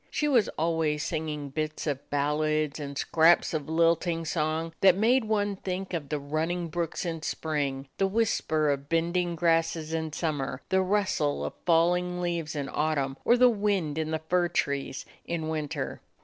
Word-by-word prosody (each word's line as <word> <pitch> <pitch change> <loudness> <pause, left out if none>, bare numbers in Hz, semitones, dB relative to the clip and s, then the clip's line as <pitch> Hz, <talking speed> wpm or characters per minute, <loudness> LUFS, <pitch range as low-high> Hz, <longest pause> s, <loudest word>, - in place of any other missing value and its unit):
She 300 - 0
was 250 -7 +3
al 165 +1 +1
ways 150 -2 0
singing 150 -2 -3
bits 155 +1 -3
of 140 -3 -3
ballads 150 +1 0
and 140 -1 -6
scraps 165 +3 +4
of 155 -2 -3
lilting 165 0 +2
song 160 +1 -1
that 190 -1 +6
made 235 +4 +3
one 205 -2 0
think 190 0 -4
of 150 -5 -3
the 150 - -1
run 155 +3 -2
ning 175 0 -2
brooks 170 +1 -3
in 165 -2 -3
spring, 145 -4 -2
the 195 - +3
whisper 160 -8 +1
of 140 0 -4
bending 170 +1 +1
grasses 165 -1 +1
in 160 -1 -2
summer, 150 -3 -3
the 190 0 +3
rustle 185 - 0
of 75 - -4
falling 180 +1 +3
leaves 170 -3 -2
in 140 -2 -2
autumn, 140 -3 -1
or 240 - +4
the 250 +1 +7
wind 200 -9 0
in 155 0 -2
the 160 0 -2
fir 180 0 +2
trees 140 -5 -2 0.2
in 160 -2 -3
winter. 155 -2 -3
160 Hz, 175 wpm, -28 LUFS, 150-180 Hz, 0.2 s, the